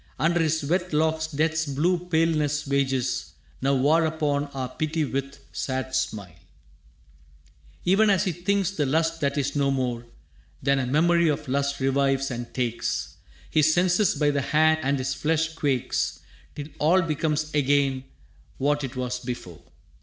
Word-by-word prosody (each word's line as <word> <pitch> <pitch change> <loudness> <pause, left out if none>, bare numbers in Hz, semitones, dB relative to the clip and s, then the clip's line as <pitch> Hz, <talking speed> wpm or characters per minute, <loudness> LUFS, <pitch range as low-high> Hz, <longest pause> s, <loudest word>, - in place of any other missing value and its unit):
Under 170 +2 +2
his 160 -1 +1
wet 175 +3 -1
locks 160 +1 +1
Death's 160 +1 0
blue 165 +6 +1
paleness 155 -3 +1
wages 130 - -1 0.3
Now 135 +1 +2
war 150 +5 +3
upon 150 -2 0
our 135 -3 -5
pity 155 +3 -2
with 135 0 -4
sad 130 0 -3
smile». 105 -10 -3 1.5
Even 205 +4 +4
as 195 -3 +3
he 185 - 0
thinks, 190 +3 0
the 150 -8 -1
lust 165 +3 0
that 140 0 0
is 140 0 -1
no 140 -1 +2
more 125 -3 -2 0.6
Than 140 0 +2
a 130 - -1
memory 170 +5 +3
of 150 -1 -1
lust 140 +1 -1
revives 135 0 +1
and 120 -1 -5
takes 120 -2 -2 0.3
His 155 0 +4
senses 180 +2 +3
by 145 -1 +2
the 145 -1 0
hand, 155 +3 +3
and 140 0 0
his 130 0 -2
flesh 160 +3 0
quakes 140 -6 -1 0.3
Till 145 +1 -7
all 175 +5 +4
becomes 155 -1 -1
again 140 -2 +1 0.5
what 145 +2 +1
'twas 125 -2 -3
before. 120 -10 -7
145 Hz, 150 wpm, -25 LUFS, 135-160 Hz, 1.5 s, Even